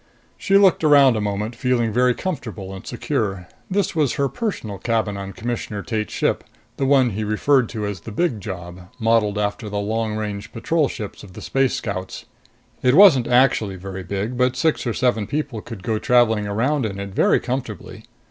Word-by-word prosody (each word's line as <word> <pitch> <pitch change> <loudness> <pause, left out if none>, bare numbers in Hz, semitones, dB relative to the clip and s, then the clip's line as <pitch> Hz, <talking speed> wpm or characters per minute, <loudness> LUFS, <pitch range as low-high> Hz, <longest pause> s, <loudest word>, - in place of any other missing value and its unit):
She 195 - +3
looked 195 -4 +4
around 140 -5 +6
a 110 - -1
moment, 105 +3 -3
feeling 120 -3 0
very 125 +1 +3
comfortable 110 - -5
and 95 - -10
secure. 110 -8 -2 0.2
This 195 -2 0
was 150 -5 +2
her 140 - +1
personal 180 - -4
cabin 110 -2 -1
on 100 0 -6
Commissioner 110 -2 -4
Tate's 110 -2 -3
ship, - - 0 0.3
the 135 - 0
one 130 -3 +4
he 105 +2 -3
referred 115 +4 +2
to 110 -3 -4
as 100 -2 -4
the 110 - -8
Big 120 -4 -1
Job, 90 -2 -8
modeled 110 -3 +2
after 105 +1 -2
the 105 - -4
long 110 +1 -1
range 105 0 -5
patrol 150 +6 0
ships 105 -7 -7
of 95 -3 -13
the - - -9
Space 135 -1 +1
Scouts. 95 -3 -5 0.6
It 125 +1 +3
wasn't 165 -11 +7
actually 120 -5 +3
very 95 +1 -7
big, 100 +6 -3
but 125 0 +2
six 155 -1 0
or 115 - 0
seven 120 -5 +1
people 145 -7 -3
could 110 -5 -9
go 110 0 -1
traveling 115 -4 +3
around 130 +8 0
in 100 -1 -6
it 100 0 -5
very - - +3
comfortably. 125 -5 -5
115 Hz, 185 wpm, -21 LUFS, 100-130 Hz, 0.6 s, wasn't